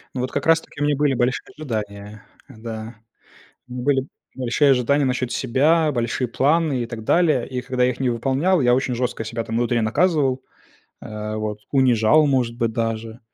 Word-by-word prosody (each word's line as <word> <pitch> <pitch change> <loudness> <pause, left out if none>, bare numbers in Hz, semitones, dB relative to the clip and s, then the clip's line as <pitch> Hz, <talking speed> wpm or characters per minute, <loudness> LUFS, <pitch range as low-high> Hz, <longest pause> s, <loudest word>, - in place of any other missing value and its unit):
Ну, 125 - -2
вот 130 - -3
как 140 - -3
раз-таки 165 -3 +1
у - - +2
меня 145 -1 +2
были 145 -1 +1
большие 125 +1 0
ожидания, 105 -6 -6 0.2
да. 110 0 -8 0.7
У - - -11
меня 125 -1 -5
были 135 -2 +1 0.3
большие 130 +3 +2
ожидания 135 +3 +2
насчет 125 -1 -1
себя, 150 +6 +2
большие 120 +1 -1
планы 145 +1 +1
и - - -4
так 115 -2 -8
далее. 155 -7 +2
И 125 -1 -4
когда 125 0 0
я 125 - +3
их 125 - -7
не 130 -2 +1
выполнял, 135 +9 +1
я 120 -1 +4
очень 130 -1 -1
жестко 120 -2 -2
себя 115 +1 -4
там 115 - -4
внутри 120 0 +1
наказывал, 135 +2 +1 0.6
а, 105 0 -6
вот, 105 -1 -3
унижал, 130 +2 +4
может 125 -4 +1
быть, 115 -2 -1
даже. 115 0 -3
125 Hz, 185 wpm, -22 LUFS, 115-140 Hz, 0.7 s, я